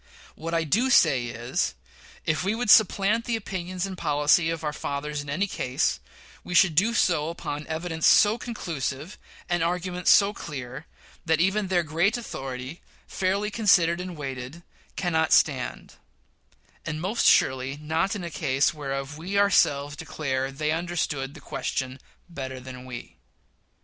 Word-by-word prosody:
What 165 +1 -4
I 165 - +2
do 225 - +1
say 130 - +4
is 115 - -2 0.5
that, - - +3
if 155 - -2
we 200 +3 0
would 230 -3 +2
supplant 215 +2 +4
the 235 - 0
opinions 185 -3 -4
and 195 -1 -6
policy 150 0 +2
of 165 -1 -3
our 150 -1 -2
fathers 145 0 -4
in 145 - -9
any 165 +8 0
case, 130 -9 -1 0.4
we 180 - -5
should 175 -2 +6
do 210 +9 +2
so 165 -7 +2
upon 150 -3 -5
evidence 160 0 -1
so 215 +3 +5
conclusive, 160 - -5 0.3
and 175 -2 0
argument 180 +1 -2
so 200 0 +6
clear, 135 -4 -7 0.4
that 160 0 +2
even 195 +3 +1
their 180 -2 +2
great 170 +9 +1
authority, 135 - -6 0.2
fairly 195 +3 -1
considered 180 -6 +3
and 180 -2 -7
weighed, 135 +3 -6 0.3
cannot 160 -3 0
stand; 135 -5 +1 0.9
and 155 0 -4
most 195 +8 +1
surely 130 +1 +3
not 160 +7 -1
in 200 - -5
a 170 - -5
case 140 -3 +1
whereof 140 -1 -5
we 190 +5 -3
ourselves 145 -8 +3
declare 135 -3 -3
they 150 +3 -2
understood 160 -5 -2
the - - -10
question 130 0 -4 0.3
better 130 -6 -6
than 130 0 -10
we. 125 -2 -9
160 Hz, 155 wpm, -26 LUFS, 140-185 Hz, 0.9 s, should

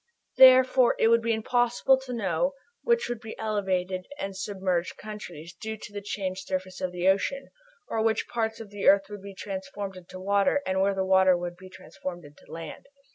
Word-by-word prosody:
Therefore, 255 -1 +7
it 225 - +4
would 230 0 +5
be 230 0 0
impossible 240 +3 +2
to 265 -1 -9
know 230 - 0 0.3
which 475 0 +2
would 240 -2 -4
be 220 -1 -8
the - - -21
elevated 190 -4 -1
and 195 -7 -5
submerged 190 -3 -2
countries, 180 -6 -9
due 220 -1 -6
to 210 - -11
the 205 - -5
changed 190 -2 -4
surface 185 0 -4
of 185 -1 -1
the 180 +1 -1
ocean, 270 +8 +1 0.4
or 225 - -1
which 220 0 +1
parts 225 -1 -2
of 220 -3 -9
the 205 -1 -2
earth 195 0 +5
would 205 -1 -7
be 200 0 -10
transformed 195 0 -6
into 185 0 -11
water, 200 +8 +2
and 190 0 0
where 195 0 +2
water 190 -1 +5
would 175 0 -5
be 185 +1 -13
transformed 185 -2 -8
into 145 0 -17
land. 165 -1 -8
195 Hz, 190 wpm, -27 LUFS, 185-225 Hz, 0.4 s, Therefore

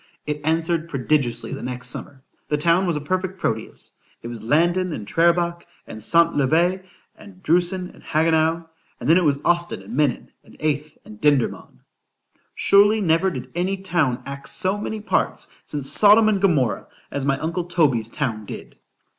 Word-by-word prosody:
——It 150 0 -3
answered 165 +1 0
prodigiously 135 -4 -1
the - - -6
next 125 0 -5
summer——the 135 +3 -6
town 170 +5 +2
was 170 - 0
a 150 - -2
perfect 185 +4 -3
Proteus——It 110 -3 -5
was 120 -2 -6
Landen, 175 +7 +1
and 105 -7 -7
Trerebach, 170 +3 +1 0.2
and 110 - -9
Santvliet, 170 - +2 0.3
and 195 -3 -15
Drusen, 180 +2 +1
and - - -18
Hagenau,—and 160 -2 -1
then 165 +3 +6
it 185 - +2
was 145 -3 +2
Ostend 170 - 0
and 105 +5 -8
Menin, 145 -3 0
and - - -18
Aeth 150 0 -2
and 105 -1 -13
Dendermond. 145 -5 0 0.7
——Surely 205 +2 +4
never 180 0 +2
did 130 -6 -7
any 185 +3 -1
TOWN 170 -10 -1
act 140 0 -6
so 190 +2 +2
many 215 +1 -5
parts, - - -1 0.2
since 145 -3 -3
Sodom 215 +1 +7
and 200 -3 0
Gomorrah, 150 - +1 0.2
as 140 - -3
my 135 -1 +2
uncle 165 +4 -3
Toby's 140 -11 +1
town 115 -7 -3
did. - - -10
160 Hz, 155 wpm, -22 LUFS, 140-180 Hz, 0.7 s, Sodom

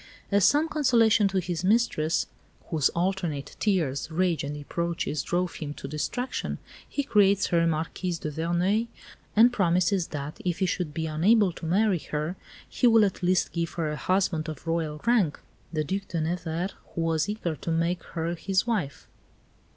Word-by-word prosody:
As 200 0 +4
some 300 +3 +4
consolation 235 -8 +4
to 195 0 -2
his 175 -2 -2
mistress, 185 -6 +2 0.5
whose 155 -4 +3
alternate 170 -5 -2
tears, 160 -10 0
rage, 170 0 0
and 145 +1 -4
reproaches 165 0 -2
drove 175 +3 -1
him 150 -2 -5
to - - -7
distraction, 245 - -3 0.3
he 285 - -1
creates 200 -5 +4
her 170 -1 +4
Marquise 165 +2 -2
de 155 -1 -4
Verneuil 175 +8 0 0.5
and 235 +3 +6
promises 180 -2 +2
that, 145 +1 -6
if 175 -2 -1
he 190 - +1
should 180 -3 -2
be 160 +2 -3
unable 185 +6 +3
to 165 - -7
marry 195 +1 +2
her, 155 +4 -3 0.3
he 245 - +2
will 225 -2 +6
at 195 - -3
least 180 0 +2
give 170 -1 -2
her 160 -3 -2
a - - -3
husband 175 -2 0
of 155 0 -8
Royal 165 -2 -1
rank, 220 -11 +2 0.3
the 155 -2 -1
Due 190 +7 -2
de 170 - -2
Nevers, 170 +2 -2 0.2
who 165 - -1
was 165 +2 +1
eager 195 -6 -2
to - - -6
make 165 +1 0
her 165 +1 -3
his 190 +3 0
wife. 200 -13 -2
175 Hz, 170 wpm, -27 LUFS, 160-195 Hz, 0.5 s, and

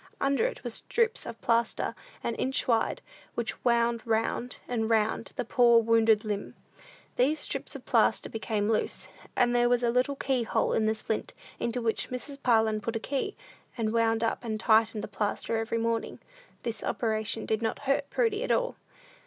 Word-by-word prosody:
Under 275 +10 +2
it - - -7
were - - -3
strips 465 0 0
of - - -7
plaster 230 0 +1 0.3
an 235 - -1
inch 265 +1 0
wide, 230 -2 +1 0.3
which 235 -2 -4
wound 235 -1 +2
round 225 +2 0
and 225 -2 -1
round 220 0 +1
the - - -2
poor 235 0 +5
wounded 225 -1 +3
limb. 205 -1 -3 0.6
These 275 +5 +3
strips - - -4
of - - -9
plaster - - +3
became 220 -2 -2
loose, 220 -1 -1 0.3
and 245 0 +3
there 240 0 +4
was 245 0 +2
a 235 - +3
little 255 +3 +1
key 265 -2 0
hole 225 - 0
in 220 -1 +2
the 220 - +2
splint, 215 0 -3 0.2
into 235 +1 -2
which 225 -1 -1
Mrs. 275 +3 -6
Parlin 220 -3 +3
put 230 +2 -3
a - - 0
key, 270 +4 -2 0.4
and 220 -1 0
wound 225 0 +2
up 230 - -1
and 220 -2 -3
tightened 220 -1 +3
the - - -4
plaster 215 +2 -2
every 225 +1 -1
morning. 230 0 -1 0.5
This 230 -2 -3
operation 220 -1 -1
did 220 0 0
not 225 -1 -1
hurt 275 +1 +1
Prudy 455 -2 +1
at - - -1
all. - - +1
230 Hz, 180 wpm, -29 LUFS, 220-250 Hz, 0.6 s, poor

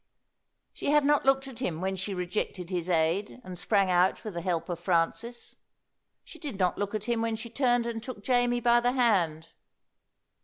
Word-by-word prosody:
She - - -6
had 295 -1 +4
not 290 -1 +3
looked 270 0 +3
at 255 -3 -10
him 175 -11 -2
when 190 +1 -1
she 190 +1 -3
rejected 180 0 -3
his 180 -1 -1
aid 170 +7 +1
and 180 -4 -8
sprang 195 -1 +2
out 180 +1 +2
with 215 - -5
the 170 - -4
help 170 -2 -1
of 175 -2 -4
Francis. 185 +7 -1 0.7
She - - -13
did 285 - -6
not 180 -2 +1
look 205 +1 -3
at 210 - -3
him 235 -1 0
when 225 -1 0
she 225 +1 -8
turned 245 -2 +2
and 230 -1 -3
took 230 -4 -8
Jamie 245 0 +2
by 240 0 +5
the 245 +1 +1
hand. 175 -11 +1
205 Hz, 195 wpm, -28 LUFS, 180-240 Hz, 0.7 s, by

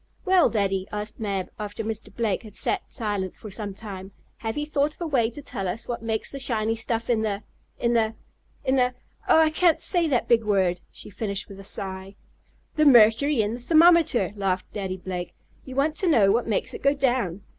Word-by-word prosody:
"Well, 370 -2 +5
Daddy," 195 -3 -1
asked 210 +1 -4
Mab, 195 -4 -3
after 210 +1 -5
Mr. 220 0 -5
Blake 225 -5 -1
had 215 -3 -11
sat - - 0
silent 205 -4 -3
for 215 - -10
some 200 -1 -4
time, 195 -3 -8 0.3
"have 225 +2 -4
you 295 - -1
thought 295 0 0
of - - -24
a - - -1
way 255 -8 +1
to 285 +5 -10
tell 195 -7 -4
us 220 +6 -4
what 240 -2 -4
makes 220 -1 -3
the 275 - -6
shiny 225 -4 +1
stuff 225 0 -3
in 230 -3 +1
the 210 -1 -2 0.3
in 235 0 +1
the 225 -1 +1 0.5
in 265 +1 +2
the 250 -1 +2 0.3
Oh! - - +6
I 315 -1 +4
can't 335 +1 +3
say 345 -3 +3
that 260 -6 0
big 230 -1 +4
word!" 190 -4 +1
she - - -11
finished 200 -1 -4
with 195 -1 -11
a - - -9
sigh. 190 0 -5 0.6
"The 305 - +4
mercury 240 +1 +5
in 210 +2 -2
the 240 - -5
thermometer!" 320 - +4
laughed 190 -2 -2
Daddy 190 -2 -4
Blake. 180 -1 -6 0.3
"You 260 - -8
want 295 +3 +1
to 380 - 0
know 210 -10 +5
what 235 +3 +1
makes 215 - -1
it - - -7
go 280 +1 +3
down? 245 -9 0
225 Hz, 210 wpm, -25 LUFS, 200-265 Hz, 0.6 s, Oh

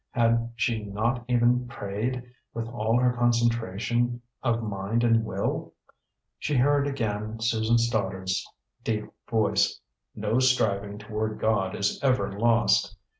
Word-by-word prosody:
Had 115 -1 +1
she 115 -2 0
not 110 +5 -1
even 125 0 +3
prayed, 120 +3 -3 0.3
with 115 0 -3
all 115 -1 +1
her 125 0 +3
concentration 120 0 +1 0.2
of 115 -2 0
mind 105 +2 -1
and 115 -1 +4
will? - - -3 0.6
She 150 - -1
heard 140 +2 +3
again 110 -5 -3
Susan 115 0 +2
Stoddard's 95 -5 0 0.4
deep 105 -2 -1 0.2
voice: 110 -2 +2 0.4
"No 110 +3 0
striving 105 -6 +1
toward 105 0 -3
God 100 -3 +1
is 100 - 0
ever 125 -8 +2
lost!" 105 -1 +2
115 Hz, 125 wpm, -27 LUFS, 105-120 Hz, 0.6 s, and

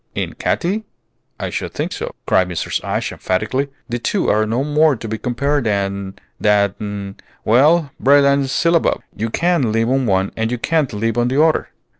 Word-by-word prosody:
"In - - -3
Katy? 200 +5 -1 0.6
I - - -3
should - - -4
think - - -2
so," - - -5
cried 90 -1 +2
Mrs. 90 - -3
Ashe, - - -2
emphatically; 130 +9 -1 0.2
"the 120 -1 -3
two 190 - 0
are 110 +1 +2
no 120 +5 0
more 150 0 +3
to 115 - -7
be 110 0 -4
compared 140 +2 -1
than 100 -2 -2 0.2
than 100 -1 0 0.3
well, 145 +6 +4
bread 140 +1 +5
and 140 -1 +2
syllabub! 165 +6 +1
You 115 +2 -2
can 170 -4 +1
live 115 +1 +1
on 135 -2 +1
one, 95 -1 +1
and 110 0 -1
you 125 - -2
can't 155 +2 0
live 115 +2 -1
on 120 - +2
the 130 +3 0
other." 160 -1 +1
120 Hz, 180 wpm, -19 LUFS, 105-145 Hz, 0.6 s, bread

